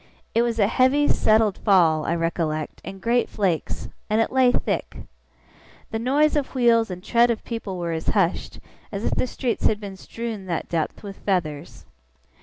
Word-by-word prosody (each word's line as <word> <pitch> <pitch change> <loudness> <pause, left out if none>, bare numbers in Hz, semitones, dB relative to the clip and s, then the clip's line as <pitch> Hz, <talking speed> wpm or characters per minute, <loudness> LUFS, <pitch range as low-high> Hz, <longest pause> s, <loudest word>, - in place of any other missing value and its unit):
It 230 - +3
was 235 -1 0
a 205 - +4
heavy, 260 +6 +3
settled 215 -2 +3
fall, 165 -7 +3
I 170 - +1
recollect, 165 -2 -2
in 195 - -7
great 235 +5 +1
flakes; 185 -6 -2 0.2
and 215 +1 +2
it 225 - +1
lay 260 -1 +4
thick. - - -2 0.9
The 225 - -2
noise 285 +6 +2
of 285 -2 -2
wheels 235 -3 +3
and 180 0 -7
tread 235 +1 +3
of 235 - -1
people 225 -5 -5
were 170 -1 -3
as 160 -1 -4
hushed, 190 -4 0 0.3
as 205 +1 -4
if - - 0
the - - 0
streets 245 -1 -1
had 210 - 0
been 200 -2 -7
strewn 220 -1 -6
that 170 -2 -2
depth 165 +3 -2
with 200 -1 -8
feathers. 170 -6 -3
210 Hz, 180 wpm, -23 LUFS, 175-235 Hz, 0.9 s, a